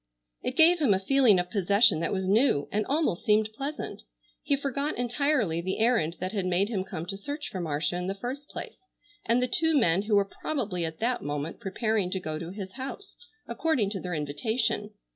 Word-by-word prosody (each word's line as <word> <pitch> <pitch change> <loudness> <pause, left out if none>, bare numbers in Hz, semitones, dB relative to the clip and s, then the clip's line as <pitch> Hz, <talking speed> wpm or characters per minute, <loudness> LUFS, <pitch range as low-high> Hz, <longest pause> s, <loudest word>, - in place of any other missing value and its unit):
It 255 - -4
gave 335 +2 +6
him 250 -11 +4
a - - 0
feeling 245 0 +4
of 180 0 -2
possession 200 -2 +4
that 165 - -1
was 190 -1 -1
new, 200 - +3
and 210 0 -1
almost 290 - 0
seemed 215 0 +2
pleasant. 280 +6 -5 0.4
He 285 - +1
forgot 280 +2 -2
entirely 245 - +1
the 190 +2 -2
errand 220 -8 +2
that 185 +1 -3
had 195 -4 -1
made 185 +3 +2
him 200 -5 -1
come 180 -4 -6
to 195 +2 -4
search 285 +10 -5
for 185 - -4
Marcia 155 +1 -1
in 180 0 -3
the 195 - -2
first 260 +7 -6
place, - - -7 0.5
and 235 +2 +3
the - - +1
two 320 +5 +2
men 180 -7 +3
who 210 +1 +1
were 200 -1 +4 0.2
probably 200 - -1
at 160 0 -5
that 240 +2 0
moment 145 +2 -4
preparing 215 -1 -1
to 190 - -2
go 155 -3 -4
to 170 0 -6
his 190 0 -7
house 275 +10 -7 0.3
according 260 -12 0
to 200 - -3
their 180 -2 -4
invitation. 205 - -1
205 Hz, 205 wpm, -28 LUFS, 180-255 Hz, 0.5 s, gave